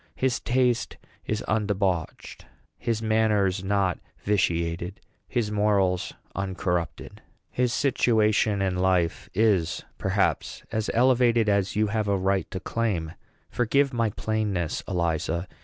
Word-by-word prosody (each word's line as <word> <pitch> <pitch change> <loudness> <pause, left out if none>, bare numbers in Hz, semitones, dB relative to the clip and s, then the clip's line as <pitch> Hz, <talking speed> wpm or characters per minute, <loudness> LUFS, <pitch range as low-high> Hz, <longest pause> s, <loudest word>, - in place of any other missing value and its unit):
His 130 -2 0
taste 125 -1 +1 0.3
is 110 0 -1
undebauched, 100 -5 -1 0.3
his 115 -1 -1
manners 105 -4 +2
not 95 -2 +1 0.2
vitiated, 85 -2 0 0.3
his 115 -4 -1
morals 100 -3 +1 0.2
uncorrupted. 90 -3 -3 0.3
His 125 -1 +1
situation 110 -6 +2
in 95 -1 0
life 90 -2 +1
is, 100 -6 +2
perhaps, - - 0
as 110 -1 -1
elevated 120 -2 +4
as 100 -2 +1
you 105 +1 +3
have 105 0 -1
a 100 -1 +2
right 95 0 0
to 95 - -4
claim. 95 -7 -2 0.4
Forgive 135 +3 +2
my 115 -2 +1
plainness, 105 -6 -2
Eliza. 85 -1 -1
105 Hz, 115 wpm, -26 LUFS, 95-110 Hz, 0.4 s, elevated